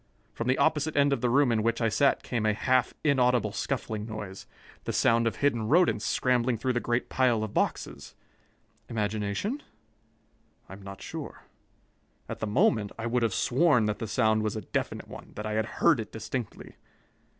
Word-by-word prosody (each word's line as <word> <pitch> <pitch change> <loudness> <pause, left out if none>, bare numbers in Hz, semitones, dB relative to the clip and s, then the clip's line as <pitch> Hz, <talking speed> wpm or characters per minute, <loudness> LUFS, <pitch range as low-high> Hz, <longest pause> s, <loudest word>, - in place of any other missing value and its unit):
From 115 - -4
the 130 - +2
opposite 155 -1 +1
end 140 0 +4
of - - -2
the 125 - +1
room 135 0 +4
in 110 -1 +1
which 115 +1 0
I 115 - +2
sat 140 +6 +2
came 120 -3 -2
a 110 -1 +2
half 130 +2 +1
inaudible 125 -7 +2
scuffling 110 -2 -3
noise 105 -4 -7 0.4
the - - -2
sound 115 0 +3
of 115 - -1
hidden 120 -6 0
rodents 175 +8 +3
scrambling 125 -1 +1
through 130 +3 -1
the 120 - +1
great 120 0 -1
pile 120 -4 +2
of 110 - -5
boxes. - - -2 0.7
Imagination? 110 - -2 1.1
I - - -10
am 100 - -11
not 95 0 -9
sure. - - -7 0.8
At - - -6
the 110 - -2
moment, 105 0 +2
I 115 - -5
would 120 +1 0
have 115 -4 0
sworn 130 -3 +3
that 105 0 -2
the 115 - -4
sound 110 -1 +2
was 110 0 -2
a 110 - -3
definite - - -3
one, - - -11
that 105 - -5
I 110 - -3
had 110 +1 0
heard 150 +4 +2
it 110 - -6
distinctly. 115 +1 -6
115 Hz, 185 wpm, -28 LUFS, 110-130 Hz, 1.1 s, end